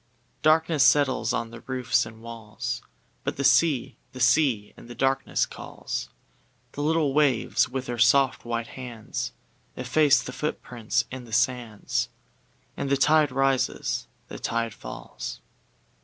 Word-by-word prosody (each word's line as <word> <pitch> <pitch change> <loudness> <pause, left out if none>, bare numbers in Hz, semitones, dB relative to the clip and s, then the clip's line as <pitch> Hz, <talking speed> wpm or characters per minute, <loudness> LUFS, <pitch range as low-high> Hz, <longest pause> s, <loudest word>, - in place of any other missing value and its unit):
Darkness 160 -1 +4
settles 140 -3 +3
on 115 -1 -2 0.2
roofs 125 -3 +1
and 110 0 -13
walls, 115 +1 -5 0.4
But - - -3
the 140 - -1
sea, 135 0 +3 0.2
the 130 - -8
sea 125 -5 +3
in - - -14
the 120 - -9
darkness 135 0 +1
calls; - - -6 0.6
The 145 - -5
little 155 -2 +2
waves, 135 -4 +2
with 130 0 -3
their 120 -1 -4
soft, 135 +3 +4
white 115 -1 -3
hands, 120 -4 -5 0.5
Efface 135 +1 +3
the 125 - -7
footprints 125 -4 -2
in 130 -1 -7
the 115 - -14
sands, 120 -2 0 0.7
And 140 - -3
the 140 - +3
tide 150 +1 +4
rises, 135 0 0 0.2
the - - -8
tide 115 -1 -1
falls. - - -7
130 Hz, 135 wpm, -26 LUFS, 115-140 Hz, 0.7 s, Darkness